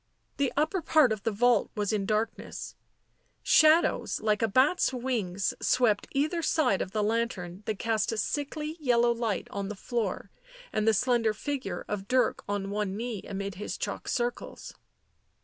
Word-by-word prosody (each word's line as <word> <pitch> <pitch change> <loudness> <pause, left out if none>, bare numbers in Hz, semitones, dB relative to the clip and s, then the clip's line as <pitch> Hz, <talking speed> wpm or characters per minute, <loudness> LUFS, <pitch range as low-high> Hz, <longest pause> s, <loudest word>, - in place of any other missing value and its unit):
The 280 -2 +1
upper 325 +5 +1
part 310 -6 +4
of 215 -2 -2
the 225 - -1
vault 245 +4 +3
was 210 -1 -1
in 200 -2 -1
darkness; 215 +1 -3 0.7
shadows 315 +2 +4
like 215 0 +1
a 225 - +3
bat's 260 - +3
wings 230 -7 -1
swept 220 -5 +2
either 310 +5 0
side 270 - +2
of - - -3
the 210 +1 -1
lantern 210 -5 -2
that 215 -2 -1
cast 220 -1 0
a 225 - -3
sickly 300 +6 -3
yellow 240 -4 +3
light 230 -4 -2
on 200 -1 -3
the 210 - -5
floor, 205 -2 -3 0.4
and 215 0 0
the 220 - +5
slender 230 -1 +2
figure 255 -12 -4
of 200 -1 -4
Dirk 255 0 +1
on 200 -1 -2
one 205 -1 -2
knee 230 -3 -4
amid 200 0 -4
his - - -4
chalk - - -4
circles. 240 -1 -3
225 Hz, 165 wpm, -28 LUFS, 205-255 Hz, 0.7 s, the